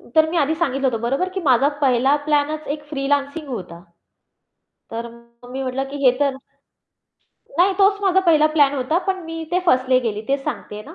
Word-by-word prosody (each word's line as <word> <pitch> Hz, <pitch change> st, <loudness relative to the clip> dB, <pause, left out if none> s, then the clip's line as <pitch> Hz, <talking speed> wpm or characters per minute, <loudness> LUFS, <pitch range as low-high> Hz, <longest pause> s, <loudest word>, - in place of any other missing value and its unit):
तर 315 Hz, 0 st, +5 dB
मी 340 Hz, -, -2 dB
आधी 310 Hz, +1 st, +1 dB
सांगितलं 275 Hz, -5 st, 0 dB
होतं 230 Hz, -3 st, -2 dB
बरोबर? 275 Hz, +10 st, -1 dB
की 380 Hz, +1 st, -4 dB
माझा 265 Hz, -2 st, +3 dB
पहिला 265 Hz, +1 st, +3 dB
प्लॅनच 300 Hz, 0 st, 0 dB
एक 295 Hz, -, -15 dB
फ्रीलान्सिंग 285 Hz, +1 st, -1 dB
होता. 180 Hz, -8 st, -6 dB, 1.1 s
तर 230 Hz, +1 st, -4 dB, 0.4 s
मग 245 Hz, -, -12 dB
मी 265 Hz, +1 st, -4 dB
म्हटलं 260 Hz, +1 st, -2 dB
की 285 Hz, -, -6 dB
हे 250 Hz, -, +7 dB
तर 280 Hz, -2 st, +1 dB, 1.2 s
नाही 375 Hz, +3 st, +5 dB
तोच 400 Hz, 0 st, +4 dB
माझा 380 Hz, -1 st, +3 dB
पहिला 315 Hz, -4 st, +4 dB
प्लॅन 285 Hz, -2 st, +4 dB
होता, 275 Hz, +5 st, 0 dB
पण 380 Hz, -1 st, -1 dB
मी 325 Hz, 0 st, -6 dB
ते 360 Hz, -, +2 dB
फसले 255 Hz, -3 st, +3 dB
गेली 210 Hz, -1 st, -3 dB
तेच 275 Hz, 0 st, 0 dB
सांगतेय 210 Hz, 0 st, -5 dB
ना. 310 Hz, +9 st, -12 dB
285 Hz, 185 wpm, -21 LUFS, 255-320 Hz, 1.2 s, हे